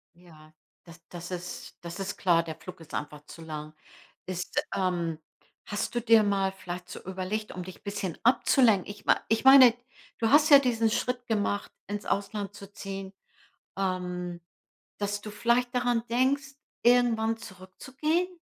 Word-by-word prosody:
Ja, 155 -3 -18 0.3
das 170 -1 -15
das 175 0 -8
ist 180 0 -7
das 170 +2 -7
ist 195 +1 -4
klar, 170 -3 +3
der 160 -1 -6
Flug 180 +3 -11
ist 165 - -14
einfach 150 0 -5
zu 165 - -12
lang. 155 -1 -7 0.5
Ist 185 -1 -2
ähm, 175 -4 -1 0.5
hast 205 +3 -3
du 240 - +1
dir 230 -1 +6
mal 195 -2 +1
vielleicht 180 -1 -7
so 190 - -9
überlegt, 190 +3 -4
um 180 - -6
dich 185 +1 -11
bisschen 200 -4 -4
abzulenken? 230 -4 +4
Ich 205 - -16
mei - - +5
ich 225 +2 +1
meine, 265 -3 +9 0.4
du 225 - +1
hast 295 +3 +6
ja 285 - +11
diesen 230 -4 +1
Schritt 250 +2 -2
gemacht, 205 -2 -1 0.2
ins 205 0 -5
Ausland 205 0 -2
zu 200 -1 -11
ziehen, 195 -1 -7 0.7
ähm, 180 -2 -3 0.6
dass 205 0 -2
du 210 - -8
vielleicht 240 +3 +1
daran 245 -2 +1
denkst, 270 +3 +1 0.3
irgendwann 235 -2 +3
zurückzugehen? 260 - -3
200 Hz, 155 wpm, -28 LUFS, 180-235 Hz, 0.7 s, ja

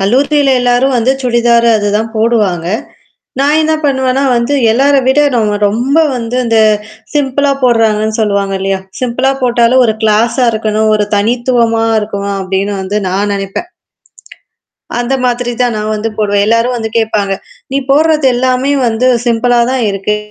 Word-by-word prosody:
கல்லூரியில 275 +7 +2
எல்லாரும் 245 +2 +1
வந்து 250 +3 +2
சுடிதார் 235 -1 +2
அதுதான் 210 +2 -1
போடுவாங்க. 210 -7 0 0.7
நான் 290 +3 +2
என்ன 315 - 0
பண்ணுவேன்னா, 265 -1 0
வந்து 235 +4 -1 0.2
எல்லார 275 +5 +2
விட 265 +3 +3
நம்ம 210 -3 0
ரொம்ப 245 +8 -1 0.2
வந்து 240 0 -4
இந்த 225 -1 +2 0.6
சிம்பிளா 285 0 0
போடுறாங்கன்னு 220 -2 +1
சொல்லுவாங்க 200 -2 0
இல்லையா, 195 0 -1 0.2
சிம்பிளா 255 +2 0
போட்டாலும் 245 +1 +3
ஒரு 220 - +1
க்ளாஸா 225 +4 +2
இருக்கணும் 220 0 -1
ஒரு 210 -1 +1
தனித்துவமா 235 +1 +1 0.2
இருக்கணும் 200 -1 -4
அப்டின்னு 195 +2 -2
வந்து 200 +2 -2
நான் 200 +3 -1
நெனைப்பேன். 195 - -5 1.3
அந்த 245 +2 -1
மாதிரி 245 0 -1
தான் 240 -3 0
நான் 215 +1 -3
வந்து 225 +2 -3
போடுவேன். 205 -1 +1
எல்லாரும் 230 +2 +1
வந்து 220 -1 -4
கேட்பாங்க. 210 -3 -1 0.4
நீ 275 - +1
போடுறது 305 -1 +3
எல்லாமே 255 +2 0 0.2
வந்து 230 +3 0 0.2
சிம்பிள்ளா 240 +1 +2
தான் 260 -2 -1
இருக்கு. 195 +2 -2
235 Hz, 140 wpm, -12 LUFS, 210-255 Hz, 1.3 s, விட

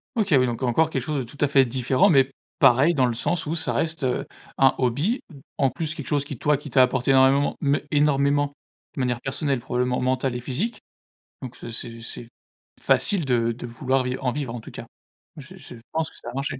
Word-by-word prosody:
OK, 215 -3 0
oui, 130 - +4
donc 120 +1 -4
encore 130 +6 +2
quelque 135 - -2
chose 150 +1 -2
de - - -2
tout 145 - -13
à - - 0
fait 140 -1 +5
différent, 130 - +2
mais 135 -5 +4 0.3
pareil 135 +8 +5
dans 130 -3 +3
le 120 - 0
sens 165 +8 -2
où 155 - -2
ça 165 - +1
reste, 160 -2 -1
heu, 125 -1 -1 0.3
un 135 -1 +5
hobby. 145 - 0 0.4
En 135 -2 +3
plus, 155 +5 -4
quelque 150 -6 -8
chose 145 -1 0
qui 140 -2 -7
toi 150 -1 +2
qui 145 +1 -10
t'a 130 - +5
apporté 125 +1 +2
énormément, 135 +1 +4
me 140 0 +2
énormément 145 -1 +2 0.4
de - - -6
manière 125 -2 -1
personnelle, 135 0 -1
probablement 125 +1 -1
mentale 130 0 0
et - - -3
physique, 140 - -3 0.6
donc, 130 -3 -8
ce - - -9
c'est 115 0 -7
c'est 115 +1 -8 0.5
facile 190 -6 +3
de 120 -3 +1
de 120 +1 -7
vouloir 130 +3 -1
viv 125 +1 -3
en 130 -2 0
vivre, 135 -3 -4
en 120 - -5
tout - - -12
cas. - - -8 0.5
Je 150 +6 -11
je 140 -7 -11 0.2
pense 160 0 -1
que - - -19
ça - - -9
va - - -9
marcher. 135 -1 -3
135 Hz, 225 wpm, -24 LUFS, 125-150 Hz, 0.6 s, fait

